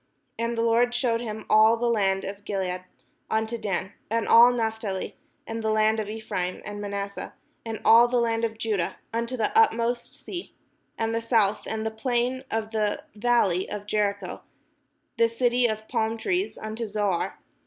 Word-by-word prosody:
And 230 0 -1
the 230 - +1
Lord 235 +1 +3
shewed 235 -2 +1
him 220 -2 -5
all 220 +1 +6
the 240 - -1
land 195 -4 +2
of 200 +1 -6
Gilead, 185 -3 -3 0.4
unto 220 +1 0
Dan. 200 -3 -3 0.2
And 230 +1 0
all 235 +2 +8
Naphtali, 220 -4 -2 0.3
and 225 0 -4
the 220 - +1
land 215 0 +3
of 210 -1 -3
Ephraim, 210 -5 -3
and 205 0 -6
Manasseh, 200 -1 -5 0.3
and 225 -1 -5
all 235 +1 +8
the 245 +1 0
land 230 -1 0
of 225 -1 -1
Judah, 210 -6 -1 0.2
unto 235 +2 -2
the 220 - -1
utmost 240 - +2
sea, 355 -1 -8 0.4
and 225 0 -1
the 230 - 0
south, 225 -3 +2
and 220 0 -3
the 220 - -1
plain 245 +3 -1
of 220 -1 -2
the 215 -2 -1
val 235 0 +3
ley 180 +1 -2
of 205 -1 -5
Jericho, 200 -3 -1 0.8
the 230 0 +5
city 245 +1 +2
of 220 -1 -4
palm 225 +1 0
trees, 365 - -1
unto 220 +1 -5
Zoar. 205 -4 -1
220 Hz, 175 wpm, -26 LUFS, 205-235 Hz, 0.8 s, all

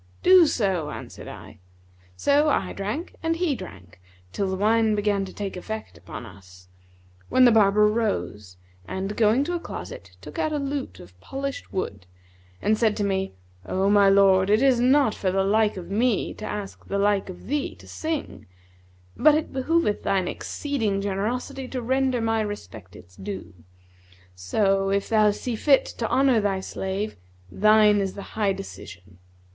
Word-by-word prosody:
'Do 365 -3 +7
so,' 190 - 0
answered - - -9
I. - - -11 0.6
So 290 - +3
I - - 0
drank 210 - -4
and 330 0 0
he 335 -3 0
drank 95 - -10 0.3
till 195 - -2
the 190 - -1
wine 220 +2 +2
began 205 -1 0
to 190 - -9
take 200 -2 -5
effect 220 +4 -6
upon - - -9
us, 90 -3 -15 0.6
when 255 - +5
the 240 - +7
barber 210 -1 +5
rose 200 - -2 0.3
and, 195 +2 -4
going 225 +4 +3
to 350 +4 -3
a 345 - -1
closet, - - -9
took - - -9
out 310 -1 0
a 300 - -1
lute 280 -1 -4
of 90 +1 -15
polished 275 - -6
wood 100 - -4 0.6
and 215 +1 +2
said 220 -3 +2
to 210 - 0
me, 190 - -1 0.3
'O 195 +2 +1
my 200 -1 +6
lord, 195 -1 +5
it 215 +5 +4
is 260 -3 +4
not 255 -1 +4
for 185 - -1
the 195 +1 +1
like 210 +1 +2
of 180 +1 -8
me 225 +1 +1
to 215 - -8
ask 205 -2 -6
the 200 - -2
like 200 -1 +1
of 180 - -10
thee 290 +2 -2
to - - -16
sing, 315 -2 -5 0.7
but 305 0 +5
it 310 - -2
behoveth 265 -3 +1
thine 190 -2 0
exceeding 225 -8 -2
generosity 235 +7 -3
to 255 - -4
render 260 +1 0
my 225 0 +1
respect 115 - -7
its 90 +1 -15
due; 100 0 -7 0.8
so, 195 - +1
if 200 0 0
thou 215 -1 +4
see 230 +3 -3
fit 275 +4 +4
to 230 - -4
honour 260 -4 +3
thy 200 -2 0
slave, 190 - -4 0.3
thine 215 0 +5
is 195 -1 -2
the 200 - -7
high 210 -2 +1
decision.' 95 - -9
210 Hz, 170 wpm, -24 LUFS, 190-255 Hz, 0.8 s, Do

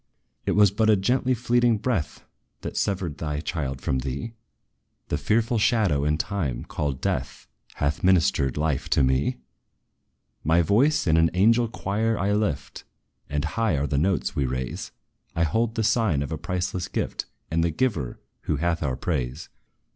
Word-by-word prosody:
"It - - +2
was 105 -2 +5
but 110 +2 +2
a 110 - +7
gently 125 +6 +1
fleeting 120 -1 +2
breath, 105 -7 -2 0.4
That - - -5
severed 90 -7 -1
thy 75 -2 -2
child 70 -5 -3
from 65 - 0
thee! 70 - -4 0.8
The 75 - 0
fearful 115 - +1
shadow, 100 - +2
in 75 0 +2
time, 80 - -2
called 70 -4 -3
Death, 65 0 -2 0.3
Hath 70 +1 -1
ministered 85 -7 +3
life 75 -2 -1
to - - +3
me. 65 +1 +1 1.1
"My 80 +3 +4
voice 130 - +3
in 80 -3 +3
an 80 0 +4
angel 115 +5 +4
choir 110 +1 -1
I 100 +3 +1
lift; 80 -11 -2 0.5
And 75 0 -1
high 110 -9 0
are 70 - 0
the 70 -1 0
notes 95 +3 0
we 70 - +1
raise: 65 0 -4 0.4
I 85 - +2
hold 115 +7 0
the 110 - 0
sign 105 - +2
of 70 - -6
a 80 - -2
priceless 90 0 -2
gift, - - -3 0.2
And 80 +1 +2
the 85 - +2
Giver, 80 - -1 0.3
who 75 - +1
hath 85 +3 0
our 70 -5 -1
praise. 65 0 -3
85 Hz, 165 wpm, -25 LUFS, 70-110 Hz, 1.1 s, a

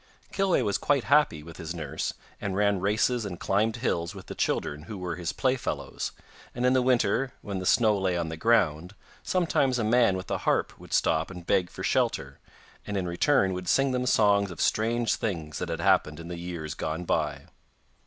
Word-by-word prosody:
Kilweh 195 -2 +2
was 100 - 0
quite 140 -4 +2
happy 140 - +3
with 85 0 -11
his 85 +2 -6
nurse, 75 -5 -4 0.3
and 95 -2 -2
ran 100 -1 +2
races 110 +5 +1
and 95 -4 -6
climbed 110 +3 +1
hills 85 -9 -2
with - - -10
the - - -7
children 75 +1 -2
who 105 - -5
were 90 -2 -4
his 85 -1 -3
playfellows, 130 -1 -2 0.4
and 125 +1 -1
in 125 - +4
the 130 - +4
winter, 125 0 +2
when 100 -2 -4
the 95 - -3
snow 110 -3 +4
lay 95 -2 0
on 85 -2 -2
the 80 - -4
ground, 90 -3 +1 0.3
sometimes 165 -9 +1
a 120 - 0
man 115 -3 +3
with 95 - -7
a - - 0
harp - - 0
would - - -14
stop 80 0 +2
and 90 -3 -9
beg 90 0 +2
for - - -8
shelter, - - 0 0.5
and 105 -1 -2
in 90 -2 -1
return 95 +2 +2
would 90 0 -5
sing 135 0 +3
them 125 0 -1
songs 100 -4 +3
of 85 - -9
strange 115 +1 +1
things 80 -8 -3
that - - -3
had - - -3
happened 75 +1 +2
in 85 +1 -8
the 85 -1 -5
years 85 -4 -5
gone 80 +3 -4
by. - - -1
100 Hz, 205 wpm, -27 LUFS, 85-120 Hz, 0.5 s, in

